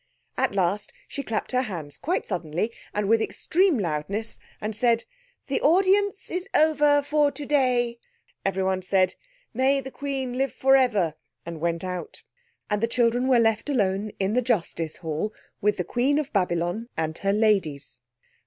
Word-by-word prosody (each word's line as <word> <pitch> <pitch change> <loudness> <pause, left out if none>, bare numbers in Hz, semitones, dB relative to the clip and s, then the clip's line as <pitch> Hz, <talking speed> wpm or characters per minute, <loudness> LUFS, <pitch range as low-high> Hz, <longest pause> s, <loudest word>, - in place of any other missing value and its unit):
At - - 0
last 195 +2 0 0.2
she 280 - -4
clapped 225 -5 -3
her 255 0 +2
hands 170 - -6
quite 335 +7 -1
suddenly 175 +3 -2 0.2
and 210 -1 -1
with 225 +1 +4
extreme 360 - +2
loudness, 195 +4 -2 0.2
and 215 0 -3
said— 235 0 +2 0.4
"The 275 - -1
audience 390 +4 +3
is 360 +2 -3
over 295 -2 +4
for 295 0 +2
today." 255 -5 +1 0.4
Everyone 190 -1 0
said, 185 0 +2 0.4
"May 265 +3 +3
the 265 0 -7
Queen 265 -3 -3
live 270 -1 0
for 270 +1 +4
ever!" 210 - +3 0.3
and 165 -2 -7
went 170 0 -1
out. 180 -1 -5 0.4
And 210 -1 -1
the 230 - +2
children 240 +1 +2
were 260 -2 +5
left 225 +3 +2
alone 205 -5 0
in 195 +1 0
the 250 - +3
justice 175 -9 -1
hall 165 +5 -3 0.3
with 210 0 +2
the 180 - 0
Queen 250 - +1
of 300 -2 -2
Babylon 180 +3 0
and 160 -1 -1
her 195 - +1
ladies. 195 - +1
225 Hz, 160 wpm, -25 LUFS, 185-270 Hz, 0.4 s, were